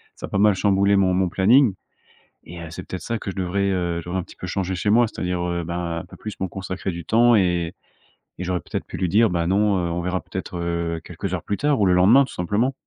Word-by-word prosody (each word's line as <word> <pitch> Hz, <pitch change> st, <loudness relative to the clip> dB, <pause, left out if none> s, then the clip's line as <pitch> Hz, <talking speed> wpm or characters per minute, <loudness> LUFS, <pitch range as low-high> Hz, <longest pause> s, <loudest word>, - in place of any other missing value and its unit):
ça -, -, -7 dB
a -, -, -11 dB
pas -, -, -1 dB
mal 105 Hz, -1 st, +5 dB
chamboulé 100 Hz, +1 st, +3 dB
mon 95 Hz, -1 st, +3 dB
mon 95 Hz, 0 st, +1 dB
planning 110 Hz, +6 st, +4 dB, 0.7 s
et 85 Hz, +1 st, -9 dB
heu, 85 Hz, -, -7 dB
c'est -, -, -7 dB
peut-être 95 Hz, -, -6 dB
ça 115 Hz, -, -3 dB
que 100 Hz, -, -5 dB
je -, -, -10 dB
devrais, 95 Hz, +1 st, 0 dB
heu, 85 Hz, -2 st, -1 dB
je -, -, -13 dB
devrais 90 Hz, +2 st, -2 dB
un -, -, -4 dB
petit -, -, -15 dB
peu -, -, -7 dB
changer 95 Hz, 0 st, -2 dB
chez 90 Hz, +3 st, -2 dB
moi. 120 Hz, +3 st, +5 dB
C'est-à-dire, 90 Hz, -4 st, -3 dB
heu, 85 Hz, -1 st, -2 dB
ben 85 Hz, 0 st, -3 dB
un -, -, -8 dB
peu -, -, -13 dB
plus 110 Hz, -, -8 dB
me 95 Hz, -, 0 dB
consacrer 95 Hz, +1 st, -5 dB
du 85 Hz, -1 st, -7 dB
temps 120 Hz, +4 st, +4 dB
et, 90 Hz, -4 st, +1 dB, 0.6 s
et 90 Hz, -, -5 dB
j'aurais 90 Hz, -1 st, -1 dB
peut-être -, -, -5 dB
pu -, -, -8 dB
lui 90 Hz, -, 0 dB
dire: 110 Hz, +5 st, +4 dB
«Ben 85 Hz, -2 st, -1 dB
non, 100 Hz, +2 st, +2 dB
heu, 85 Hz, -2 st, -1 dB
on 85 Hz, -, -2 dB
verra 90 Hz, +1 st, -2 dB
peut-être, 95 Hz, -1 st, -6 dB
heu, 85 Hz, -1 st, -2 dB
quelques 90 Hz, +2 st, -5 dB
heures 90 Hz, -, -3 dB
plus 100 Hz, -, -2 dB
tard 145 Hz, 0 st, +1 dB
ou -, -, +4 dB
le 90 Hz, -, +4 dB
lendemain». 100 Hz, +10 st, +6 dB
Tout 130 Hz, -, -12 dB
simplement. 105 Hz, +9 st, 0 dB
95 Hz, 270 wpm, -23 LUFS, 85-100 Hz, 0.7 s, lendemain